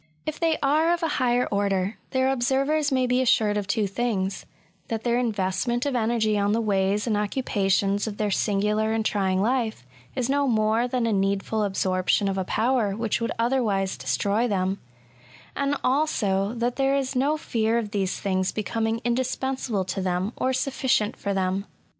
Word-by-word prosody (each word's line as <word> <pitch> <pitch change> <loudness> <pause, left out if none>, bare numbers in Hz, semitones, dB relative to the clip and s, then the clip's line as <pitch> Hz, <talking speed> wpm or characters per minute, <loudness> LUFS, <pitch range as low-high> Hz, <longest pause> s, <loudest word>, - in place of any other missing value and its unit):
If 310 - -4
they 325 -2 +2
are 310 +4 +3
of 345 0 0
a - - +2
higher 245 0 +2
order, 200 0 0
their 260 0 +1
observers 275 +4 +1
may 260 -1 +2
be 250 +1 +2
assured 220 -4 +3
of 205 -2 -2
two 210 0 +1
things 195 -2 -2 0.2
— - - -37
that 225 -3 -3
their 240 0 +1
investment 225 +2 -1
of 280 -2 -1
energy 220 -2 +1
on 200 +1 +1
the 225 - +2
ways 200 -1 +1
and 225 -3 +1
occupations 205 -2 0
of 210 -1 -5
their 210 -1 0
singular 210 +2 +1
and 220 -1 -1
trying 190 -2 +1
life, 225 - -1 0.3
is 245 - 0
no 280 +1 +1
more 220 0 +2
than 250 -1 -1
a 225 - +1
needful 200 +2 0
absorption 190 0 +1
of 195 0 -1
a - - 0
power 225 -2 +1
which 225 0 -1
would 230 - -1
otherwise 230 -6 +1
destroy 200 - 0
them; 190 -2 -1 0.8
and 280 +1 0
also, 220 -8 +1
that 240 +1 -1
there 270 0 +2
is 270 -1 -1
no 285 +4 +2
fear 230 -6 0
of 215 -3 -2
these 195 -2 -1
things 185 -2 0
becoming 225 +2 -2
indispensable 255 -3 -1
to 190 +1 -3
them 185 +3 -1
or 260 - 0
sufficient 260 -4 0
for 200 - -3
them. 190 +1 -1
220 Hz, 175 wpm, -25 LUFS, 200-255 Hz, 0.8 s, are